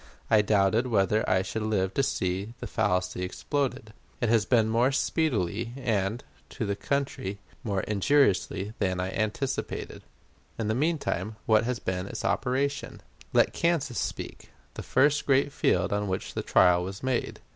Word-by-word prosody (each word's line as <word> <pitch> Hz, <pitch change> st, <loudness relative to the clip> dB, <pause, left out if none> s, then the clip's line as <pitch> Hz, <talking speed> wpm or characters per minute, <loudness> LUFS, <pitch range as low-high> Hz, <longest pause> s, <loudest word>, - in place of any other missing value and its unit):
I 110 Hz, -1 st, +6 dB
doubted 105 Hz, +3 st, +2 dB
whether 105 Hz, -2 st, +2 dB
I 95 Hz, 0 st, +3 dB
should 100 Hz, +4 st, -4 dB
live 100 Hz, -3 st, 0 dB
to -, -, +2 dB
see 95 Hz, -1 st, -2 dB
that -, -, -5 dB
fallacy 90 Hz, -5 st, 0 dB
exploded. 110 Hz, +3 st, -2 dB, 0.3 s
It 120 Hz, -, 0 dB
has 115 Hz, -2 st, +3 dB
been 115 Hz, -4 st, +4 dB
more 115 Hz, +4 st, +2 dB
speedily, 115 Hz, -, 0 dB
and, 110 Hz, -2 st, -1 dB, 0.3 s
to 115 Hz, -, -4 dB
the 100 Hz, -1 st, -1 dB
country, 135 Hz, -6 st, -2 dB, 0.3 s
more 100 Hz, -4 st, -1 dB
injuriously 105 Hz, -3 st, +1 dB
than 95 Hz, -1 st, 0 dB
I 90 Hz, +1 st, -2 dB
anticipated. 110 Hz, +6 st, -3 dB, 0.6 s
In 110 Hz, -2 st, -2 dB
the -, -, +2 dB
mean 155 Hz, +7 st, +1 dB
time, 105 Hz, -, -3 dB
what 110 Hz, 0 st, +4 dB
has 125 Hz, 0 st, -1 dB
been 95 Hz, -2 st, -3 dB
its -, -, -5 dB
operation? 140 Hz, +2 st, -1 dB, 0.3 s
Let -, -, +3 dB
Kansas 170 Hz, -8 st, 0 dB
speak -, -, -5 dB, 0.2 s
the -, -, -6 dB
first 145 Hz, +1 st, +2 dB
great 140 Hz, +1 st, +3 dB
field 90 Hz, +2 st, +1 dB
on 105 Hz, 0 st, -1 dB
which 95 Hz, 0 st, -3 dB
the -, -, -2 dB
trial 90 Hz, -1 st, +4 dB
was 95 Hz, +4 st, -7 dB
made. 130 Hz, -2 st, -1 dB
110 Hz, 160 wpm, -27 LUFS, 95-130 Hz, 0.6 s, I